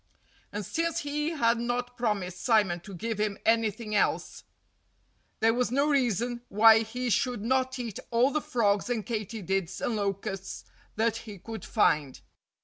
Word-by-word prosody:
And 205 -1 -4
since 335 - -1
he 295 +1 -2
had 235 -8 +2
not 245 +1 -2
promised 195 -7 -2
Simon 205 -7 +3
to 195 +2 -10
give 220 +3 -3
him 210 -1 0
anything 225 -1 +1
else, 210 - 0 1.0
there 225 +1 +4
was 245 +1 +1
no 280 +3 +2
reason 240 -3 +1
why 220 +2 +7
he 245 +2 -3
should 245 -3 0
not 260 +2 +1
eat 235 -5 -5
all 245 +3 +3
the 305 - 0
frogs 210 -4 +1
and 230 -4 -1
katydids 200 -5 -3
and 235 - -1
locusts 195 -1 -3 0.3
that 225 +1 +1
he 215 -3 -9
could 225 +4 -8
find. 150 - +1
225 Hz, 150 wpm, -28 LUFS, 205-245 Hz, 1.0 s, why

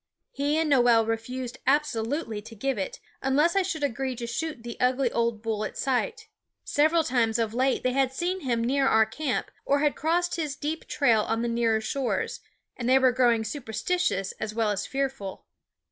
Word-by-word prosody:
He 290 - 0
and 320 0 +1
Noel 240 -5 +5
refused 235 +2 -4
absolutely 265 -4 0
to 225 +2 -12
give 265 +1 -1
it, 190 - -4 0.2
unless 295 +7 +2
I 390 - +4
should 340 -5 -3
agree 265 -1 -1
to 235 0 -5
shoot 255 +2 -4
the 235 -1 -6
ugly 250 0 +2
old 230 -2 -1
bull 220 -2 -1
at - - -5
sight. 440 - -1 0.4
Several 315 +3 +3
times 240 -5 +1
of 225 -2 -1
late 260 +2 +1
they 255 - +2
had 265 -1 +2
seen 350 +7 -2
him 240 -7 -1
near 270 +3 +2
our 220 -3 +5
camp, 255 +5 -3
or 280 +1 +2
had 295 -1 +2
crossed 345 +2 0
his 305 -4 -2
deep 305 +3 -4
trail 230 -7 +3
on 225 +2 -1
the - - 0
nearer 230 -2 +1
shores, 255 +3 -2 0.4
and 245 -1 -2
they 260 - +6
were 260 -1 +4
growing 240 -3 +3
superstitious 220 - -1
as 215 0 -4
well 225 -2 +1
as 200 -1 -2
fearful. 270 -8 -3
255 Hz, 190 wpm, -27 LUFS, 225-290 Hz, 0.4 s, they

